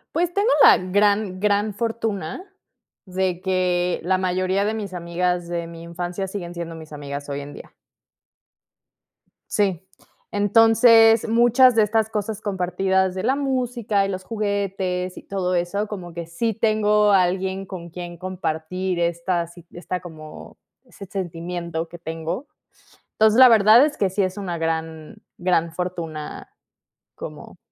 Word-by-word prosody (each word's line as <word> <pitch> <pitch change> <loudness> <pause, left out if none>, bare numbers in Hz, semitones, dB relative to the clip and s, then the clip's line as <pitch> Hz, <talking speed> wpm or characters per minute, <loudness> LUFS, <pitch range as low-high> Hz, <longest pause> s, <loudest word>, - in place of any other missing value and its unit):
Pues, 345 +1 +1
tengo 405 +5 +2
la - - +9
gran 200 +1 +1
gran 205 +1 +1
fortuna, 225 - -3 0.6
de 185 -1 -2
que, 180 -1 0
la 185 +2 +2
mayoría 185 +1 0
de 215 - 0
mis 210 -4 -5
amigas 175 0 -2
de 170 -1 -3
mi 165 0 -10
infancia 175 +3 -4
siguen 185 -3 -6
siendo 170 -1 -6
mis 160 -1 -11
amigas 145 -1 -7
hoy 140 0 -3
en 145 0 -8
día. - - -12 1.8
Sí, 190 -4 0 0.5
entonces, 225 +2 +5
muchas 240 +2 +5
de 225 - +5
estas 220 +1 +1
cosas 215 -1 -3
compartidas 190 -1 0
de 190 - -3
la 260 +4 +2
música, 245 -7 0
y - - -3
los 185 -1 -4
juguetes, 195 -4 -2
y - - -9
todo 185 -2 -2
eso, 180 +5 -1
como 180 -5 -7
que 170 0 -5
sí 220 +8 -2
tengo 210 -1 +2
a 195 -2 +5
alguien 190 +2 -2
con 180 -3 -8
quien 175 0 -8
compartir 185 0 -3
estas 170 0 -1
sí 175 -2 -14
esta 180 +1 -4
como 155 -3 -11 0.3
ese 220 -5 -12
sentimiento 170 -2 -4
que 175 - -11
tengo. 165 - -5 0.7
Entonces, 220 +1 +3
la 260 -1 +10
verdad 225 +3 +7
es 300 -1 -5
que 195 - +1
sí 190 - -2
es 185 0 -3
una 180 -4 -4
gran 160 -1 -4 0.2
gran 175 -2 +1
fortuna 165 -3 -5 0.6
como - - -9
185 Hz, 145 wpm, -22 LUFS, 175-210 Hz, 1.8 s, la